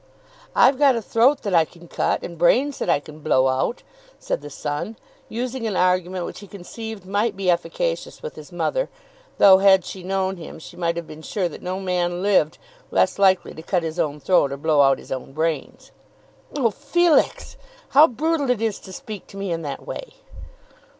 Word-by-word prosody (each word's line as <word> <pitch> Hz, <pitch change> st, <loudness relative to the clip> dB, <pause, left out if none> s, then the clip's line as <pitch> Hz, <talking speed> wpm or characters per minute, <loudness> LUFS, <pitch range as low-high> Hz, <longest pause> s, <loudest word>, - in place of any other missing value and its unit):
"I've 270 Hz, -, +5 dB
got 280 Hz, -3 st, +5 dB
a -, -, 0 dB
throat 255 Hz, +7 st, +3 dB
that 200 Hz, -4 st, -2 dB
I 165 Hz, -2 st, +6 dB
can 170 Hz, +2 st, -14 dB
cut, -, -, -1 dB
and 170 Hz, -, -6 dB
brains 255 Hz, -, +2 dB
that -, -, -2 dB
I 160 Hz, -, +4 dB
can 150 Hz, +1 st, -13 dB
blow 130 Hz, -3 st, +3 dB
out," 130 Hz, -, -1 dB, 0.3 s
said -, -, -3 dB
the 145 Hz, -, -8 dB
son, 145 Hz, +10 st, -4 dB, 0.3 s
using 245 Hz, +1 st, -3 dB
an 205 Hz, -, -2 dB
argument 180 Hz, 0 st, +1 dB
which -, -, -7 dB
he 205 Hz, -, -11 dB
conceived 205 Hz, +2 st, -8 dB
might 205 Hz, +2 st, 0 dB
be 190 Hz, -2 st, +2 dB
efficacious -, -, -2 dB
with 475 Hz, -, -5 dB
his -, -, -11 dB
mother; -, -, -1 dB, 0.5 s
though, 190 Hz, -1 st, +8 dB
had 190 Hz, -2 st, +5 dB
she 190 Hz, -, -7 dB
known 190 Hz, +1 st, -1 dB
him, 165 Hz, -, -9 dB
she 165 Hz, +2 st, -12 dB
might 170 Hz, -1 st, -1 dB
have 170 Hz, -1 st, -4 dB
been 155 Hz, 0 st, -11 dB
sure 185 Hz, +3 st, -2 dB
that 165 Hz, -, -10 dB
no 185 Hz, +1 st, -3 dB
man 180 Hz, -1 st, -1 dB
lived 190 Hz, -7 st, +2 dB, 0.3 s
less -, -, +1 dB
likely 190 Hz, -2 st, +3 dB
to 160 Hz, -, -9 dB
cut 175 Hz, +1 st, -1 dB
his 160 Hz, +1 st, -4 dB
own 150 Hz, -3 st, -1 dB
throat 145 Hz, -2 st, +3 dB
or 140 Hz, -, -4 dB
blow 150 Hz, 0 st, +3 dB
out 135 Hz, -1 st, +5 dB
his -, -, -14 dB
own 135 Hz, 0 st, -5 dB
brains. 165 Hz, -, -3 dB, 0.7 s
"Oh, 240 Hz, -5 st, +2 dB
Felix! 345 Hz, -, +1 dB, 0.3 s
how 295 Hz, +3 st, +7 dB
brutal 295 Hz, +2 st, -1 dB
it 250 Hz, -4 st, +2 dB
is 225 Hz, -2 st, -1 dB
to 190 Hz, -, -12 dB
speak 215 Hz, -2 st, -8 dB
to 195 Hz, -, -12 dB
me 195 Hz, -2 st, -3 dB
in 165 Hz, 0 st, -2 dB
that 145 Hz, -3 st, -6 dB
way." -, -, -7 dB
190 Hz, 200 wpm, -22 LUFS, 165-230 Hz, 0.7 s, though